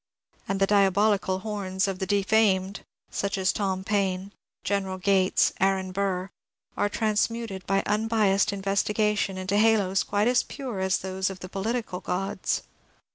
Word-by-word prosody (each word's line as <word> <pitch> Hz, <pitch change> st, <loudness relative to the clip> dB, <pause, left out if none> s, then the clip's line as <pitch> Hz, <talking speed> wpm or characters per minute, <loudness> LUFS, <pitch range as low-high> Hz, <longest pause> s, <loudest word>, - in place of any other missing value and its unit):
And 195 Hz, 0 st, -1 dB
the 195 Hz, -, +4 dB
diabolical 200 Hz, -1 st, +3 dB
horns 200 Hz, -2 st, -2 dB
of 190 Hz, -1 st, -3 dB
the 190 Hz, -, -2 dB
de 205 Hz, -1 st, +2 dB
famed 195 Hz, -2 st, +2 dB
— -, -, -67 dB
such 200 Hz, 0 st, -2 dB
as 190 Hz, 0 st, +1 dB
Tom 190 Hz, -2 st, -2 dB
Paine, 195 Hz, -1 st, -1 dB, 0.3 s
General 195 Hz, -2 st, -1 dB
Gates, 190 Hz, 0 st, +2 dB
Aaron 190 Hz, -1 st, +1 dB
Burr 190 Hz, 0 st, -2 dB, 0.2 s
— -, -, -45 dB
are 205 Hz, -, +1 dB
transmuted 215 Hz, -1 st, -1 dB
by 195 Hz, +1 st, +2 dB
unbiased 210 Hz, -2 st, +2 dB
investigation 200 Hz, 0 st, 0 dB
into 185 Hz, +2 st, -1 dB
halos 205 Hz, -3 st, +3 dB
quite 205 Hz, +2 st, 0 dB
as 245 Hz, 0 st, +4 dB
pure 255 Hz, -8 st, -6 dB
as 190 Hz, 0 st, +1 dB
those 190 Hz, +1 st, -2 dB
of 190 Hz, -1 st, -9 dB
the 185 Hz, -, -7 dB
political 215 Hz, -1 st, -3 dB
gods. 195 Hz, +2 st, -2 dB
195 Hz, 155 wpm, -26 LUFS, 190-210 Hz, 0.3 s, the